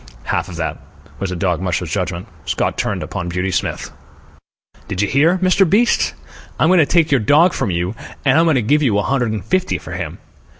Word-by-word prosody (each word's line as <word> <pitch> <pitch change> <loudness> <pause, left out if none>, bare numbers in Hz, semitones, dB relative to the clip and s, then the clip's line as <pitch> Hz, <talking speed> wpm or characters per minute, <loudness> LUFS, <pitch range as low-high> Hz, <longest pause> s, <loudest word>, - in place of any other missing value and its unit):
"Half - - -2
of - - -8
that," - - -3 0.4
was 100 - -2
the 90 - -3
dog 90 -1 -1
musher's 90 -3 -2
judgment. 90 -2 -3 0.2
Scott - - -1
turned - - -2
upon 85 - -5
Beauty 90 +2 -2
Smith. - - -2 1.0
"Did 95 +1 -1
you - - +1
hear, 155 - +3
Mr. 185 0 +4
Beast? 225 +6 +2 0.4
I'm 155 - +4
going 185 -1 +5
to 150 - +4
take 165 -3 +2
your 135 - +4
dog 150 - +4
from 135 - -1
you, 90 +2 -1 0.3
and 135 +3 +4
I'm 165 - +4
going 160 -3 +3
to 125 - +1
give 150 +8 +2
you 115 -8 +2
a 105 - +1
hundred 125 -5 0
and 105 -4 -4
fifty 185 0 0
for - - -10
him." - - -5
120 Hz, 215 wpm, -18 LUFS, -, 1.0 s, going